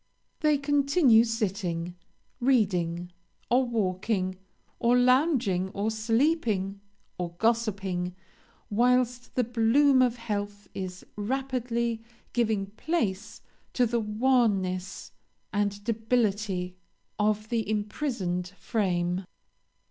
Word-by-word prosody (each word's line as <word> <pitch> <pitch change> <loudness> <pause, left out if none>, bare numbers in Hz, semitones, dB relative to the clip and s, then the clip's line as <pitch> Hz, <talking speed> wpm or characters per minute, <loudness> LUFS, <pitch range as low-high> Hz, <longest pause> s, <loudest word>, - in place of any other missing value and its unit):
They 305 -2 +3
continue 280 -3 +4
sitting, 190 -7 -2 0.4
reading, 180 -9 +1 0.4
or 255 +2 +4
walking, 185 -4 -1 0.4
or 240 +1 +4
lounging, 250 - +3
or 205 +2 0
sleeping, 220 - 0 0.4
or 175 -1 -3
gossiping, 195 -5 0 0.6
whilst 245 +2 +1
the 250 - +3
bloom 245 +4 +4
of 245 -2 +3
health 205 -3 -4
is 185 -1 -6
rapidly 235 0 -2 0.3
giving 220 -4 +1
place 215 - -3 0.3
to 250 - +3
the 235 0 0
wanness 210 -5 0 0.4
and 205 0 -1
debility 210 -5 0 0.4
of 215 0 +1
the 230 -3 -1
imprisoned 210 -4 -2
frame. 180 -3 -1
220 Hz, 90 wpm, -28 LUFS, 190-245 Hz, 0.6 s, continue